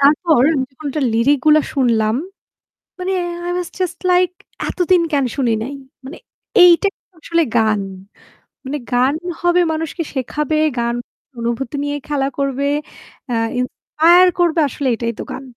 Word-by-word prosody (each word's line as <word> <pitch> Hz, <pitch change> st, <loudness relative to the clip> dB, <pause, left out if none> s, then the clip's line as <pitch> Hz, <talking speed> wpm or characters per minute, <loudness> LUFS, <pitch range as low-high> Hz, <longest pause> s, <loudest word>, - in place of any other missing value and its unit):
তারপর 300 Hz, 0 st, +4 dB
আমি 260 Hz, -2 st, 0 dB
যখন 290 Hz, +3 st, -10 dB
ওটার 290 Hz, -1 st, -1 dB
লিরিক 270 Hz, +5 st, +3 dB
গুলো 305 Hz, 0 st, +6 dB
শুনলাম, 230 Hz, -4 st, +2 dB, 0.8 s
মানে 370 Hz, +1 st, -2 dB, 0.3 s
আই 350 Hz, -, -2 dB
ওয়াজ 360 Hz, -2 st, -3 dB
জাস্ট 355 Hz, -1 st, -2 dB
লাইক 360 Hz, 0 st, +4 dB, 0.4 s
"এতদিন 360 Hz, -1 st, +2 dB
কেন 280 Hz, -2 st, +2 dB
শুনি 250 Hz, -5 st, +1 dB
নাই!" 275 Hz, +4 st, -5 dB, 0.3 s
মানে 280 Hz, -, -8 dB, 0.5 s
এইটাইতো 360 Hz, +2 st, +3 dB
আসলে 335 Hz, +2 st, +1 dB
গান। 215 Hz, -2 st, +2 dB, 0.8 s
মানে 290 Hz, +3 st, -3 dB
গান 250 Hz, +3 st, +3 dB, 0.3 s
হবে 350 Hz, +1 st, +3 dB
মানুষকে 325 Hz, +2 st, -3 dB
শেখাবে, 300 Hz, +3 st, -2 dB, 0.2 s
গান 235 Hz, 0 st, 0 dB, 0.4 s
অনুভূতি 235 Hz, +3 st, -3 dB
নিয়ে 290 Hz, 0 st, -2 dB
খেলা 275 Hz, -2 st, 0 dB
করবে, 275 Hz, 0 st, -1 dB, 0.6 s
অ্যা 240 Hz, -, -1 dB, 0.2 s
ইন্সপায়ার 335 Hz, +8 st, +3 dB
করবে 340 Hz, -2 st, +2 dB
আসলে 275 Hz, +1 st, -3 dB
এটাই 230 Hz, 0 st, -2 dB
তো -, -, -3 dB
গান। 270 Hz, -, -6 dB
290 Hz, 145 wpm, -18 LUFS, 255-335 Hz, 0.8 s, গুলো